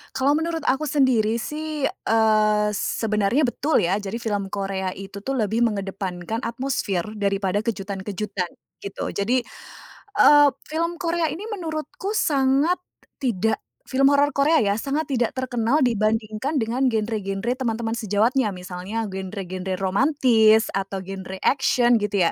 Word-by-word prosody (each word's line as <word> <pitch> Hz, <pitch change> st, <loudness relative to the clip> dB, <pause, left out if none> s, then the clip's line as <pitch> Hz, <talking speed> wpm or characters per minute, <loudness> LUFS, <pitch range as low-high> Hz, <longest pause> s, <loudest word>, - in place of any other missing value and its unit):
Kalau 270 Hz, +2 st, +2 dB
menurut 325 Hz, +1 st, -1 dB
aku 295 Hz, +2 st, +1 dB
sendiri 255 Hz, -7 st, +2 dB
sih, 300 Hz, +4 st, -4 dB
eee, 215 Hz, -4 st, +2 dB
sebenarnya 210 Hz, +5 st, 0 dB
betul 265 Hz, -, +1 dB
ya. 190 Hz, +4 st, +1 dB
Jadi 205 Hz, +1 st, -5 dB
film 210 Hz, -4 st, -2 dB
Korea 195 Hz, -1 st, -3 dB
itu 195 Hz, +1 st, -8 dB
tuh 270 Hz, +7 st, -3 dB
lebih 220 Hz, -2 st, 0 dB
mengedepankan 195 Hz, -2 st, -2 dB
atmosfer 230 Hz, -6 st, -2 dB, 0.2 s
daripada 200 Hz, -1 st, 0 dB
kejutan-kejutan, 200 Hz, -3 st, -3 dB, 0.3 s
gitu. 200 Hz, 0 st, -6 dB
Jadi, 240 Hz, +5 st, 0 dB, 0.8 s
eee, 290 Hz, 0 st, +8 dB, 0.2 s
film 335 Hz, +2 st, -2 dB
Korea 335 Hz, -1 st, 0 dB
ini 330 Hz, -, -7 dB
menurutku 340 Hz, 0 st, -4 dB
sangat 285 Hz, -1 st, +2 dB, 0.4 s
tidak 220 Hz, -4 st, 0 dB, 0.3 s
film 275 Hz, +2 st, +4 dB
horor 285 Hz, +1 st, +4 dB
Korea 295 Hz, +2 st, +4 dB
ya, 200 Hz, -1 st, +1 dB
sangat 290 Hz, +6 st, -2 dB
tidak 245 Hz, -4 st, 0 dB
terkenal 260 Hz, +2 st, 0 dB
dibandingkan 225 Hz, +4 st, 0 dB
dengan 240 Hz, +4 st, 0 dB
genre-genre 220 Hz, -1 st, -1 dB
teman-teman 230 Hz, -2 st, -2 dB
sejawatnya, 215 Hz, +2 st, +1 dB
misalnya 185 Hz, +4 st, -5 dB
genre-genre 190 Hz, -1 st, -5 dB
romantis, 220 Hz, 0 st, +4 dB
atau 195 Hz, 0 st, -3 dB
genre 190 Hz, 0 st, -7 dB
action 255 Hz, -3 st, +3 dB
gitu 200 Hz, -5 st, +1 dB
ya. -, -, -4 dB
225 Hz, 130 wpm, -23 LUFS, 200-270 Hz, 0.8 s, eee